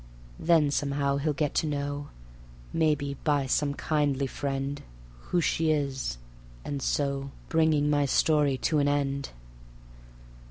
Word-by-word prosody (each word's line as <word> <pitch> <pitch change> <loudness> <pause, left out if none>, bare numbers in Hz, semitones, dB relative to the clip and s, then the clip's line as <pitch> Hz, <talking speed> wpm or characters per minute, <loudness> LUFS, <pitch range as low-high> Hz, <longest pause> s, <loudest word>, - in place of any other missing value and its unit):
Then 160 -3 +4
somehow 140 -1 0
he'll 150 +2 0
get 150 0 -1
to 160 - +1
know 145 0 -3 0.6
(Maybe 150 -4 +1
by 145 -3 +2
some 140 +2 +1
kindly 145 -3 0
friend) 135 +1 -3 0.5
Who 175 - +2
she 160 0 +1
is, 135 - -1 0.5
and 140 -1 -3
so... 140 0 +1
and 135 - -7
so - - -15 0.2
Bring 160 -2 +3
my 145 -1 +2
story 145 -1 +3
to 155 +3 +1
an 145 - +2
end. 140 -1 0
145 Hz, 135 wpm, -28 LUFS, 140-150 Hz, 0.6 s, Then